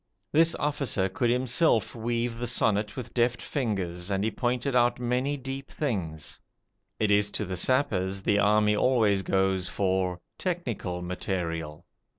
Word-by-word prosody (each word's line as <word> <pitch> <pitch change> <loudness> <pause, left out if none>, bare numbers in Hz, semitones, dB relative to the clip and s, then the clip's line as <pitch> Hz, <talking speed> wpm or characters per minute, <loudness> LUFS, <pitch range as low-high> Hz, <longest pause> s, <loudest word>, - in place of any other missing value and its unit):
This 165 +2 +4
officer 140 -10 0
could 120 +6 0
himself 125 - +2
weave 115 0 -2
the 120 - -2
sonnet 105 -2 +1
with 125 - -6
deft 120 0 +2
fingers, 95 - -3
and 100 0 0
he 110 - 0
pointed 125 +3 -1
out 120 0 +3
many 125 +4 0
deep 135 +1 -6
things. 90 - -3 0.6
It 105 -1 +1
is 105 0 +4
to 105 - -1
the 95 0 -4
sappers 95 -4 +1
the 100 0 +2
army 105 +1 +4
always 110 -5 +3
goes 95 -1 +1
for 95 -2 0 0.2
"technical 120 - -3
material". 85 -3 -4
105 Hz, 145 wpm, -27 LUFS, 95-125 Hz, 0.6 s, This